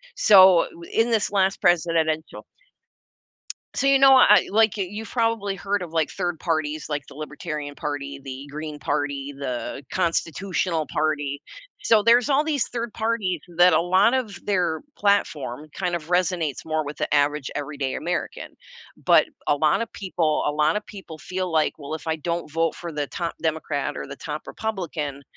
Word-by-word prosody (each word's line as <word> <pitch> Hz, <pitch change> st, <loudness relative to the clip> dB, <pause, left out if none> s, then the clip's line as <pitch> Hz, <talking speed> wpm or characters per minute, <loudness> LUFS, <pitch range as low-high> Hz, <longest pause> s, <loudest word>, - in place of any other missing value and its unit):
So, 190 Hz, -4 st, +7 dB
we 170 Hz, -, -11 dB
in 225 Hz, +1 st, +1 dB
this 215 Hz, -3 st, +1 dB
last 195 Hz, -1 st, +1 dB
presidential 165 Hz, -3 st, +1 dB, 1.3 s
So, 275 Hz, -, +1 dB
you 275 Hz, 0 st, +5 dB
know, 270 Hz, 0 st, +8 dB
I 255 Hz, -, +8 dB
I -, -, +6 dB
like, 215 Hz, +1 st, +3 dB
eh, 195 Hz, -, -1 dB
you've 215 Hz, +2 st, -7 dB
probably 225 Hz, -4 st, 0 dB
heard 200 Hz, +1 st, -2 dB
of, 170 Hz, -, -6 dB
like, 160 Hz, -2 st, +1 dB
3rd 175 Hz, -4 st, -3 dB
parties, 155 Hz, -2 st, -2 dB
like, 145 Hz, -2 st, -3 dB
the -, -, -13 dB
Libertarian 150 Hz, -1 st, -6 dB
Party, 140 Hz, -1 st, -5 dB
the 135 Hz, 0 st, -8 dB
Green 150 Hz, 0 st, -6 dB
Party, 145 Hz, -1 st, -2 dB
the 135 Hz, 0 st, -4 dB
Constitutional 170 Hz, -1 st, -1 dB
Party. 145 Hz, -2 st, -1 dB, 0.4 s
So, 220 Hz, -2 st, +4 dB
there's 235 Hz, +4 st, +5 dB
all 285 Hz, +2 st, +3 dB
these 300 Hz, -5 st, 0 dB
3rd 235 Hz, -2 st, -5 dB
parties 220 Hz, -6 st, -1 dB, 0.2 s
that 180 Hz, +1 st, +7 dB
a 160 Hz, -, +4 dB
lot 190 Hz, +6 st, +3 dB
of 245 Hz, -6 st, -2 dB
their 180 Hz, -5 st, 0 dB, 0.2 s
platform 155 Hz, -9 st, 0 dB
kind 180 Hz, -1 st, -2 dB
of 160 Hz, -2 st, -6 dB
resonates 175 Hz, -6 st, 0 dB
more 155 Hz, 0 st, -1 dB
with 145 Hz, +1 st, -7 dB
the -, -, -3 dB
average 145 Hz, -1 st, +1 dB
everyday 145 Hz, -2 st, -3 dB
American, 175 Hz, +1 st, -3 dB, 0.5 s
but -, -, +5 dB, 0.2 s
a -, -, +4 dB
lot 150 Hz, +8 st, +2 dB
of 230 Hz, -, -4 dB
people 170 Hz, -5 st, -1 dB
a -, -, +1 dB
lot 150 Hz, +1 st, +2 dB
of 210 Hz, -, -3 dB
people 190 Hz, -6 st, -10 dB
feel 185 Hz, +2 st, -4 dB
like, 155 Hz, -1 st, +2 dB
"Well, 145 Hz, +2 st, -5 dB
if 160 Hz, -, -10 dB
I 160 Hz, 0 st, 0 dB
don't 170 Hz, 0 st, -3 dB
vote 165 Hz, 0 st, 0 dB
for 170 Hz, -1 st, -7 dB
the 145 Hz, -2 st, -3 dB
top 170 Hz, +3 st, -4 dB
Democrat 155 Hz, -3 st, -2 dB
or -, -, -5 dB
the 140 Hz, 0 st, -8 dB
top 150 Hz, 0 st, -6 dB
Republican, 165 Hz, -10 st, -4 dB
165 Hz, 175 wpm, -24 LUFS, 150-195 Hz, 1.3 s, know